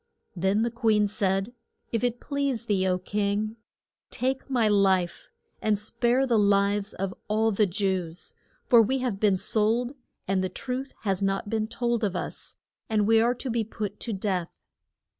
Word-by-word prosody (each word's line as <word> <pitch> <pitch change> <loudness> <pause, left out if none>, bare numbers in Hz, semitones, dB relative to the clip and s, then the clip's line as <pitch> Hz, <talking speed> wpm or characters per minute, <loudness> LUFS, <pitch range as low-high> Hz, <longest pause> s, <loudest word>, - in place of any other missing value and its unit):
Then 190 +4 +1
the 235 - 0
queen 220 -3 +2
said, 200 +1 -1 0.4
If 230 0 -1
it 245 -1 0
please 280 -5 -2
thee, 195 -4 +1
O 180 -1 +2
king, 205 +3 -1 0.5
take 265 +2 -2
my 240 -5 +2
life 190 -4 +2 0.3
and 215 -1 +2
spare 240 +5 +1
the 235 -4 +3
lives 200 0 +2
of 195 -1 -3
all 220 +1 +2
the 205 0 +2
Jews. 185 -3 -2 0.3
For 235 -2 +7
we 260 +5 +1
have 250 -6 -2
been 200 -3 +3
sold 225 +6 +1 0.3
and 190 0 +1
the 185 - -1
truth 260 +7 -5
has 195 -3 0
not 195 +1 -1
been 220 -1 0
told 235 0 -1
of 200 -3 0
us, - - -6 0.3
and 215 -2 +2
we 225 +1 +5
are 240 +2 +2
to 250 +1 -4
be 230 -1 +1
put 210 -2 -5
to 235 - -4
death. 190 -4 -1
210 Hz, 170 wpm, -27 LUFS, 195-235 Hz, 0.5 s, For